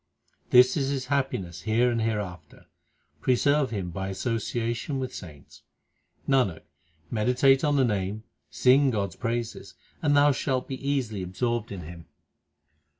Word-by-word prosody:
This 125 0 +6
is 135 -3 0
his 135 -2 -2
happiness 95 -12 -2
here 115 +4 +2
and 115 -1 -1
hereafter; 105 -5 -4 0.6
preserve 140 +2 +2
him 95 -6 -4
by 95 +2 -4
association 115 +5 -2
with 130 -1 -4
saints. 75 -5 -11 0.7
Nanak, 125 - +2 0.5
meditate 125 +4 +3
on 145 -2 +2
the 135 -2 +4
Name, 105 -1 -2 0.3
sing 135 - +4
God 100 -5 -1
s - - -15
praises, 115 -1 -4 0.3
and 145 -2 +3
thou 145 +1 +6
shalt 130 -1 -1
be 130 0 -6
easily 120 -8 -1
absorbed 115 +5 -2
in 95 -3 -6
Him. 85 +1 -10
120 Hz, 140 wpm, -26 LUFS, 100-135 Hz, 0.7 s, This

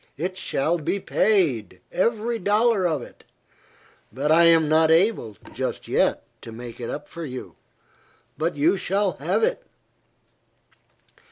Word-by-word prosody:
It 180 +5 -3
shall 170 -1 -1
be 180 +6 -2
paid, 150 - +1
every 230 +5 0
dollar 210 0 +2
of 155 -7 -2
it; - - -15 0.9
but 140 +7 -1
I 170 +2 +6
am 165 -2 +5
not 160 +1 +4
able, 160 - +2 0.2
just - - -4
yet, - - +1 0.2
to 115 - -10
make 120 +1 -9
it 120 - -5
up 145 - -6
for 170 - -8
you. 130 -4 -7 0.8
But 165 +3 -2
you 160 +7 +2
shall 195 +1 0
have - - 0
it." - - +1
170 Hz, 140 wpm, -23 LUFS, 145-200 Hz, 0.9 s, I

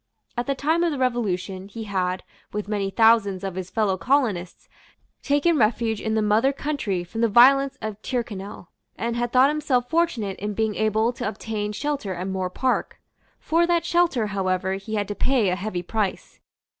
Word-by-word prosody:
At 240 +2 -2
the 275 - 0
time 320 +5 +1
of 340 - +2
the 290 - -3
Revolution, 200 -7 -1
he 225 +2 -7
had, 185 -3 -2 0.3
with 210 -1 -4
many 205 -2 -1
thousands 220 -3 +3
of 195 -1 -3
his 185 0 -5
fellow 205 -3 0
colonists, 215 -8 0 0.5
taken 290 +2 +2
refuge 220 0 +1
in 220 0 -1
the 220 - +2
mother 215 +6 +3
country 270 -11 -2
from 225 +6 -5
the 230 - +4
violence 270 +5 +5
of 215 -1 -5
Tyrconnel, 210 -8 -5 0.3
and 235 0 -2
had 240 0 -1
thought 260 +2 +5
himself 265 -5 0
fortunate 250 - 0
in 210 +1 -3
being 220 0 0
able 220 +3 +1
to 235 - -4
obtain 215 -1 -3
shelter 245 -5 -3
at 180 +2 -4
Moor 190 -1 -2
Park. 255 +7 -1 0.4
For 335 +2 +2
that 340 -1 +1
shelter, 340 -10 +2
however, 190 -2 -1
he 195 +3 -5
had 205 -1 -1
to 205 - -3
pay 240 -2 +2
a 180 - +1
heavy 185 -2 -4
price. 205 +1 -3
220 Hz, 180 wpm, -24 LUFS, 195-260 Hz, 0.5 s, violence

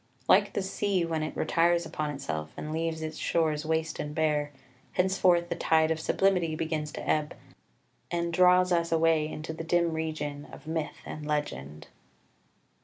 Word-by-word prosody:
Like - - +5
the 200 - -1
sea 190 -2 0
when 165 -1 -2
it 155 - -4
retires 170 -1 +2
upon 155 -1 -3
itself 80 - -4
and 155 - -5
leaves 160 0 -2
its 155 0 -5
shores 155 -2 0
waste 160 0 -1
and 150 0 -4
bare, 150 -2 +1 0.4
henceforth 180 -2 +3
the - - -1
tide 160 0 +3
of 160 - 0
sublimity 180 -2 +1
begins 155 -1 -2
to - - -6
ebb, 150 -1 0 0.7
and 170 0 -1
draws 180 +1 +5
us 170 -1 +1
away 165 -1 +3
into 155 +1 -5
the 165 - -6
dim 170 0 +2
region 155 -2 -4
of - - -12
myth 160 -1 -3
and 150 -1 -7
legend. 75 - -3
160 Hz, 165 wpm, -29 LUFS, 150-170 Hz, 0.7 s, Like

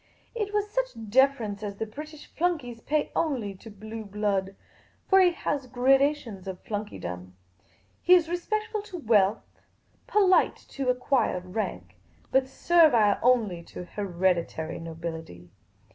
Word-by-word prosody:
It 425 -4 -3
was 415 0 0
such - - -3
deference 240 -5 +2
as 205 -2 -5
the 220 - -3
British 300 +7 -10
flunkey 320 -8 0
pays 300 0 0
only 250 -11 -1
to 195 +4 -13
blue 220 +2 -8
blood; 200 -2 -1 0.5
for 385 - +6
he 365 - +6
has 290 -6 -3
gradations 260 -5 +1
of 185 -1 -7
flunkeydom. 90 - -6 0.7
He 365 - +7
is 340 -3 +3
respectful 425 +5 -2
to 405 -3 -8
wealth; 215 - +1 0.5
polite 385 -3 +4
to 270 -2 -2
acquired 250 -8 0
rank; 90 - -4 0.3
but 265 0 +3
servile 265 - +4
onl}^ 220 -9 +2
to 180 - -8
hereditary 175 -4 -1
nobility. 160 - -7
225 Hz, 130 wpm, -27 LUFS, 190-305 Hz, 0.7 s, He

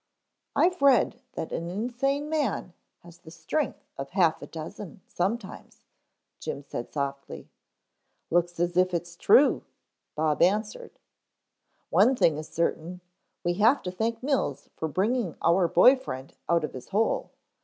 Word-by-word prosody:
"I've 360 -1 +2
read 260 -3 +4
that 160 - -5
an 170 +1 -3
insane 250 +8 -1
man 295 - -1 0.3
has 170 0 -15
the 170 -2 -14
strength 165 - -3
of 135 0 -5
half 175 -4 +2
a - - -8
dozen 185 +5 -8
sometimes," 200 +7 -4 0.6
Jim 140 - -5
said 120 -4 -6
softly. 140 -1 -5 0.8
"Looks 175 0 +1
as 175 0 0
if 185 -1 +3
it's 170 0 -4
true," 260 +11 +4 0.5
Bob 155 -1 0
answered. 210 +5 0 0.9
"One 265 - +5
thing 160 -10 +2
is 155 - -7
certain, 170 +2 -2 0.4
we 175 - +1
have 240 +7 +4
to 180 - -3
thank 225 +5 -2
Mills 265 - -1
for 160 - -3
bringing 200 - 0
our 170 +1 +3
boy 255 +10 +6
friend 140 - -7 0.2
out 170 -1 +3
of 155 - -4
his 130 - -9
hole. 215 +3 0
180 Hz, 145 wpm, -27 LUFS, 165-235 Hz, 0.9 s, boy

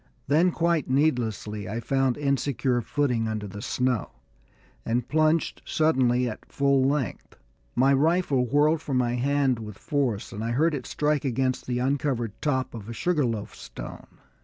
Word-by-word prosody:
Then, 160 +6 +4
quite 170 -4 0
needlessly, 115 -8 0
I 115 +3 -3
found 130 +1 +1
insecure 140 -3 0
footing 120 -2 0
under 110 -1 -3
the 100 +1 -8
snow, 125 -2 0 0.7
and 120 +1 -1
plunged 155 +1 +1
suddenly 130 -6 +2
at 110 - -8
full 140 -1 +3
length. 135 -6 -2 0.4
My 135 +3 +4
rifle 150 -2 +2
whirled 150 +4 +3
from 135 -4 -1
my 120 -1 +1
hand 135 0 +1
with 105 -2 -8
force, 130 -8 -1
and 105 - -5
I 115 +1 -1
heard 160 +6 +2
it 135 -4 -4
strike 150 -1 0
against 130 -1 -1
the 125 -1 -1
uncovered 130 -3 0
top 130 -4 0
of 110 -2 -8
a - - -4
sugar 150 0 +1
loaf 110 -3 -4
stone. - - -9
130 Hz, 160 wpm, -26 LUFS, 120-145 Hz, 0.7 s, Then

